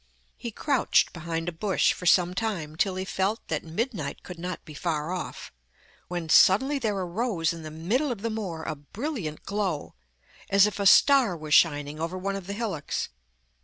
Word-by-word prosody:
He 235 - -6
crouched 270 +3 +2
behind 165 0 -4
a - - 0
bush 190 +4 +1
for 180 - -5
some 180 0 +5
time, 185 -8 -3
till 190 +3 +1
he 185 0 -3
felt 195 +3 0
that - - -1
midnight 170 - -3
could 180 -2 -9
not 180 +1 -5
be 155 - -10
far 155 +1 -2
off, 185 - -6 0.5
when 175 -2 -4
suddenly 265 - +5
there 215 -5 -1
arose 180 -2 -1
in 165 - -8
the 155 - -7
middle 205 - -1
of 220 -4 -5
the 230 - -1
moor 185 -7 -4
a 155 - -3
brilliant 185 - -5
glow, 200 -7 -2 0.6
as 200 0 +6
if 210 -1 -2
a 200 - +3
star 255 -4 +6
was 155 -1 -3
shining 145 -2 +3
over 165 +3 -3
one 195 +1 -2
of 195 -2 -6
the 200 - -3
hillocks. 200 -9 -3
185 Hz, 185 wpm, -27 LUFS, 165-215 Hz, 0.6 s, as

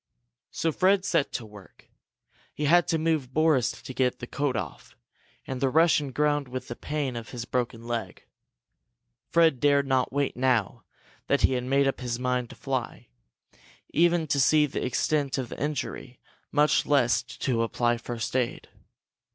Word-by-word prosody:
So 165 - -1
Fred 190 +4 +2
set 150 -7 +1
to 120 - -4
work. 105 -3 -16 0.7
He 150 - -2
had 175 +4 +4
to 165 - +1
move 155 -5 -1
Boris 155 -6 +3
to 130 - -7
get 125 -1 +1
the - - -7
coat 140 +1 -2
off, 85 -9 -6 0.5
and 130 0 -5
the 135 - +3
Russian 150 -2 +3
groaned 145 +1 +1
with 130 +1 -6
the 120 - -5
pain 145 -3 -3
of 115 -1 -6
his 120 -2 -6
broken 120 -2 -3
leg. 120 -1 -4 1.1
Fred 165 -6 +4
dared 140 0 +3
not 130 -2 +1
wait, 140 +1 -1
now 125 -5 0 0.4
that - - +2
he - - +4
had 125 -1 -2
made 135 +1 +2
up 135 - -1
his 120 -2 -2
mind 125 -1 -1
to - - -11
fly, 130 - -4 0.8
even 170 0 +3
to 140 -2 0
see 150 +3 +5
the 145 - -4
extent 140 +2 0
of 130 -3 -3
the - - -8
injury, 130 -3 -4 0.3
much 150 +1 +3
less 125 -5 +3
to 125 -1 -2
apply 120 +1 +1
first 120 0 -5
aid. 125 -2 -1
130 Hz, 165 wpm, -27 LUFS, 120-150 Hz, 1.1 s, see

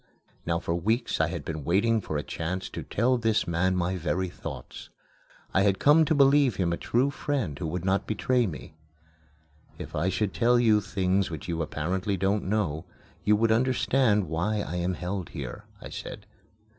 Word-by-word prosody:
Now 85 0 +1
for 85 - -2
weeks 110 +5 0
I 80 - +3
had 85 -3 -5
been 80 -2 -4
waiting 105 +8 +2
for 80 -5 -3
a 75 - -2
chance 90 +3 -4
to - - -6
tell 125 +3 +1
this 110 -2 +1
man 90 +2 +1
my 90 +1 0
very 90 +2 -1
thoughts. - - -8 0.6
I 95 - +4
had 100 -1 +3
come 150 +7 +5
to 155 - +1
believe 140 -4 +5
him 85 -3 0
a - - -2
true 130 +4 +1
friend 130 - -2
who 85 - -3
would 90 +3 -4
not 95 +1 +1
betray 120 +2 +1
me. 80 -3 -8 1.0
"If - - -8
I 85 +5 +1
should 95 +1 -1
tell 120 0 +3
you 110 -3 +4
things 95 -1 0
which 80 -2 -7
you 85 -1 -2
apparently 90 +6 -2
don't 100 +3 0
know, 90 -7 -1 0.4
you 105 - +4
would 110 +1 +2
understand 120 -3 +2
why 90 +7 -1
I 90 - -4
am 90 +1 -1
held 90 0 -4
here," - - -7
I - - -9
said. - - -8
95 Hz, 185 wpm, -27 LUFS, 85-115 Hz, 1.0 s, come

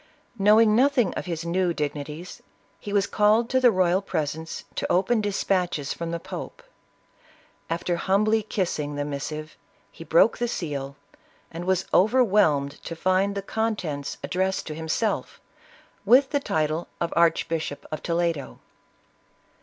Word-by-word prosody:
Knowing 215 +2 +5
nothing 255 -4 +3
of - - -5
his 170 -1 -4
new 175 0 0
dignities, 150 +3 -5 0.4
he 205 - -7
was 200 -1 +2
called 215 +2 +3
to 260 - +3
the 250 -1 +6
royal 185 -2 +2
pres 160 -7 -2
ence, 160 +1 -7
to - - -2
open 205 +5 +2
dispatches 185 -7 -1
from 170 0 -5
the 170 0 -3
pope. - - -8 1.1
After 170 +1 -1
humbly 215 +5 +2
kissing 170 -8 -2
the 145 0 -2
missive, 150 +2 -5 0.4
he - - -11
broke - - +4
the 240 - 0
seal, 140 - -4 0.6
and 170 +2 -6
was 190 0 +1
over 240 +7 +5
whelmed 155 - +2
to 165 - -6
find 185 +4 +1
the 200 - -3
contents 190 -11 -3
addressed 190 +1 -1
to 155 - -5
himself, 160 +7 -2 0.6
with 255 +6 +5
the 285 - +2
title 155 - -1
of 170 - -2
Archbishop 165 -2 +1
of 155 - -4
Toledo. 170 -4 -1
180 Hz, 145 wpm, -25 LUFS, 155-210 Hz, 1.1 s, the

